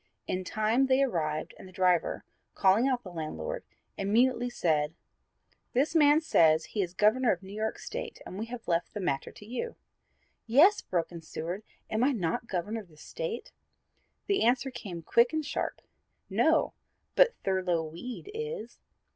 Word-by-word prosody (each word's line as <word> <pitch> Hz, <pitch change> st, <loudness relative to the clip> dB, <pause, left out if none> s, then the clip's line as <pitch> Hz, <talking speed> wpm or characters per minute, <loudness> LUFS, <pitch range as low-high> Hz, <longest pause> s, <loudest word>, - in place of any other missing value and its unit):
In 185 Hz, 0 st, -2 dB
time 215 Hz, +7 st, +2 dB
they 265 Hz, +1 st, +4 dB
arrived 155 Hz, -, -1 dB
and -, -, -10 dB
the -, -, -13 dB
driver, 180 Hz, -2 st, +1 dB, 0.3 s
calling 200 Hz, +6 st, +4 dB
out 255 Hz, -2 st, 0 dB
the 185 Hz, -, -9 dB
landlord, 320 Hz, -, -4 dB, 0.4 s
immediately 240 Hz, +5 st, +2 dB
said, 160 Hz, -8 st, 0 dB, 0.8 s
"This 280 Hz, +6 st, +2 dB
man 300 Hz, -1 st, +6 dB
says 160 Hz, -, +4 dB
he 210 Hz, -, -2 dB
is 180 Hz, -1 st, -3 dB
Governor 220 Hz, +5 st, +4 dB
of 185 Hz, -, -2 dB
New 190 Hz, +1 st, -9 dB
York 220 Hz, +1 st, -2 dB
State -, -, -6 dB
and 190 Hz, -, -7 dB
we 225 Hz, -, -3 dB
have 240 Hz, -1 st, -8 dB
left 170 Hz, +2 st, 0 dB
the -, -, -2 dB
matter 140 Hz, -8 st, -1 dB
to 205 Hz, -, -13 dB
you." 255 Hz, -, -4 dB, 0.7 s
"Yes," 315 Hz, -, +6 dB
broke 170 Hz, -2 st, -2 dB
in 170 Hz, -1 st, -8 dB
Seward, 165 Hz, +4 st, -5 dB, 0.3 s
"am 220 Hz, +2 st, 0 dB
I 280 Hz, +2 st, +4 dB
not 185 Hz, +1 st, -1 dB
Governor 205 Hz, +4 st, -2 dB
of 200 Hz, -, -16 dB
this 155 Hz, -2 st, -15 dB
State?" 165 Hz, +9 st, -5 dB, 0.7 s
The 400 Hz, -1 st, +1 dB
answer 255 Hz, +3 st, +2 dB
came 175 Hz, -9 st, -7 dB
quick 235 Hz, -, +4 dB
and 315 Hz, -1 st, -1 dB
sharp; -, -, -3 dB, 0.5 s
"No, -, -, +3 dB, 0.4 s
but -, -, +5 dB
Thurlow 185 Hz, -3 st, +1 dB
Weed 230 Hz, -, -7 dB
is." 455 Hz, +2 st, -5 dB
215 Hz, 165 wpm, -30 LUFS, 175-255 Hz, 0.8 s, man